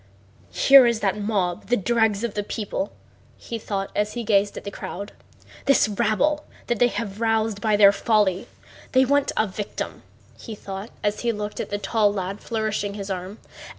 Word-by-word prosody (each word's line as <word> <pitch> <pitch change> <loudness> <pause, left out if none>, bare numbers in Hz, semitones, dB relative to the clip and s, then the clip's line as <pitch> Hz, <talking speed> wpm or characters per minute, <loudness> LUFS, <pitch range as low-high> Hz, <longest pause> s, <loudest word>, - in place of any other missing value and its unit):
"Here 270 -2 +8
is 235 -2 +1
that 200 +1 0
mob, 195 -5 -1
the 245 - +2
dregs 220 0 +1
of 235 -3 -2
the 205 - -1
people," 215 +7 -4 0.5
he 230 - -6
thought 195 -2 -3
as 210 0 0
he 240 - -4
gazed 205 -1 +2
at - - -7
the 200 - -6
crowd: 200 +1 -7 0.5
"this 275 -5 +4
rabble 235 +8 +1 0.2
they 240 +1 +3
have 220 -3 -5
roused 220 -2 +1
by 215 -2 +2
their 200 -1 +8
folly! 200 -2 +1 0.5
They 260 0 +5
want 285 +1 +2
a 220 - +3
victim," 205 +1 -5 0.4
he 225 - -7
thought 195 +1 -7
as 205 0 0
he 235 - 0
looked 210 -1 -5
at - - -3
the 205 - -1
tall 205 +1 +2
lad 195 0 -4
flourishing 215 -2 -2
his 200 -1 -5
arm. 185 +3 -5
210 Hz, 180 wpm, -24 LUFS, 200-230 Hz, 0.5 s, Here